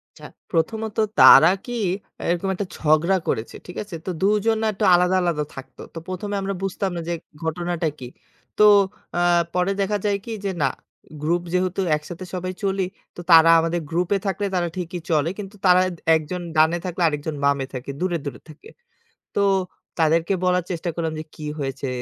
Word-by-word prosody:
আচ্ছা, -, -, -11 dB, 0.3 s
প্রথমত 215 Hz, +6 st, -1 dB, 0.2 s
তারা 160 Hz, +5 st, +9 dB, 0.2 s
কি 245 Hz, -, -5 dB, 0.6 s
এরকম 175 Hz, +3 st, -1 dB
একটা 195 Hz, +2 st, -3 dB
ঝগড়া 155 Hz, +4 st, +3 dB
করেছে। 110 Hz, -, -2 dB
ঠিক 180 Hz, -, -10 dB
আছে? 205 Hz, -3 st, -10 dB
তো -, -, -1 dB
২ 195 Hz, -, +3 dB, 0.2 s
জন 225 Hz, 0 st, +3 dB
না -, -, +1 dB
একটু 210 Hz, +1 st, -2 dB
আলাদা, 180 Hz, +1 st, +3 dB
আলাদা 165 Hz, -4 st, 0 dB
থাকতো। 135 Hz, 0 st, -10 dB
তো -, -, -5 dB
১ম 185 Hz, +2 st, -4 dB
এ -, -, 0 dB
আমরা 195 Hz, 0 st, -2 dB
বুঝতাম 195 Hz, 0 st, -2 dB
না -, -, -2 dB
যে 175 Hz, -, 0 dB, 0.3 s
ঘটনাটা 170 Hz, 0 st, -2 dB
কি? 125 Hz, -, -8 dB, 0.5 s
তো 210 Hz, -, +6 dB, 0.5 s
আ -, -, +2 dB, 0.3 s
পরে 180 Hz, +2 st, +1 dB
দেখা 205 Hz, +1 st, 0 dB
যায় 205 Hz, -1 st, +2 dB
কি 230 Hz, -, -6 dB
যে, 200 Hz, -, 0 dB
না 135 Hz, -, +4 dB, 0.5 s
গ্রুপ 170 Hz, +3 st, +1 dB
যেহেতু 185 Hz, +1 st, 0 dB, 0.2 s
একসাথে 170 Hz, +4 st, -8 dB
সবাই 185 Hz, 0 st, -3 dB
চলি, 195 Hz, -1 st, 0 dB, 0.3 s
তো -, -, -7 dB
তারা 165 Hz, 0 st, +8 dB
আমাদের 165 Hz, +1 st, -1 dB
গ্রুপ 175 Hz, +1 st, 0 dB
এ -, -, 0 dB
থাকলে 200 Hz, +1 st, -1 dB
তারা 175 Hz, -1 st, +1 dB
ঠিকই 180 Hz, 0 st, -4 dB
চলে। 155 Hz, 0 st, +2 dB
কিন্তু 200 Hz, 0 st, -7 dB
তারা 180 Hz, 0 st, +6 dB, 0.3 s
১ 160 Hz, -, +1 dB
জন 180 Hz, -1 st, -3 dB, 0.2 s
ডানে 160 Hz, +2 st, +4 dB
থাকলে, 180 Hz, 0 st, -3 dB
আরেকজন 150 Hz, 0 st, -4 dB
বামে 140 Hz, -1 st, +2 dB
থাকে 130 Hz, +2 st, -6 dB
দূরে, 180 Hz, -1 st, 0 dB
দূরে 140 Hz, -, -6 dB
থাকে। 155 Hz, -1 st, -14 dB, 0.7 s
তো -, -, +1 dB, 0.6 s
তাদেরকে 165 Hz, +3 st, +2 dB
বলার 180 Hz, -1 st, +2 dB
চেষ্টা 175 Hz, 0 st, -3 dB
করলাম 165 Hz, -1 st, -2 dB
যে, 155 Hz, -, -5 dB
কি 155 Hz, -, -8 dB
হয়েছে 135 Hz, -1 st, -4 dB
175 Hz, 190 wpm, -22 LUFS, 160-190 Hz, 0.7 s, তারা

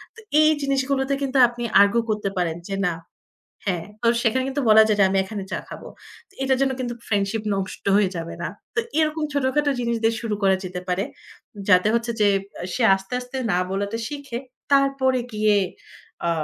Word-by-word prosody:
তো -, -, -13 dB, 0.2 s
এই 310 Hz, -, +6 dB
জিনিসগুলোতে 275 Hz, 0 st, 0 dB
কিন্তু 270 Hz, 0 st, -1 dB
আপনি 240 Hz, 0 st, -7 dB, 0.2 s
আরগু 200 Hz, +4 st, +4 dB
করতে 210 Hz, -2 st, -1 dB
পারেন 170 Hz, -2 st, 0 dB
যে, 195 Hz, -, -2 dB
না 175 Hz, -, 0 dB, 0.7 s
হ্যাঁ, 175 Hz, -4 st, -1 dB, 0.2 s
তো 230 Hz, -, +1 dB, 0.2 s
সেখানে 255 Hz, +3 st, +2 dB
কিন্তু 270 Hz, +1 st, -2 dB
বলা 220 Hz, 0 st, +8 dB
যায় 210 Hz, -, +1 dB
যে, -, -, +7 dB
আমি 195 Hz, -, +1 dB
এখানে 200 Hz, 0 st, -6 dB
চা -, -, -2 dB
খাবো। -, -, -9 dB, 0.4 s
তো -, -, -26 dB
এটার 265 Hz, -1 st, +2 dB
জন্য 270 Hz, -1 st, +2 dB
কিন্তু 245 Hz, -1 st, -2 dB
ফ্রেন্ডশিপ 205 Hz, +1 st, 0 dB
নষ্ট 195 Hz, -1 st, -5 dB
হয়ে 205 Hz, -3 st, +3 dB
যাবে 165 Hz, 0 st, -5 dB
না। -, -, -2 dB, 0.3 s
তো -, -, +2 dB, 0.2 s
এরকম 310 Hz, 0 st, +1 dB
ছোটখাটো 285 Hz, +1 st, +1 dB
জিনিস 235 Hz, -1 st, 0 dB
দিয়ে 225 Hz, +1 st, +3 dB
শুরু 220 Hz, -3 st, -2 dB
করা 190 Hz, -1 st, +5 dB
যেতে 180 Hz, 0 st, -5 dB
পারে। 180 Hz, +2 st, 0 dB, 0.7 s
যাতে 185 Hz, +1 st, +5 dB
হচ্ছে 235 Hz, 0 st, 0 dB
যে, 205 Hz, -, +5 dB, 0.3 s
অ্যা 175 Hz, -, -6 dB
সে 250 Hz, -, 0 dB
আস্তে, 195 Hz, +5 st, -8 dB
আস্তে 250 Hz, +2 st, -7 dB
না 175 Hz, -, +2 dB
বলাটা 200 Hz, +3 st, -2 dB
শিখে। 285 Hz, -5 st, -6 dB, 0.3 s
তারপরে 275 Hz, -2 st, +3 dB
গিয়ে, 210 Hz, 0 st, +3 dB, 0.7 s
আ -, -, +2 dB
230 Hz, 190 wpm, -23 LUFS, 195-265 Hz, 0.7 s, বলা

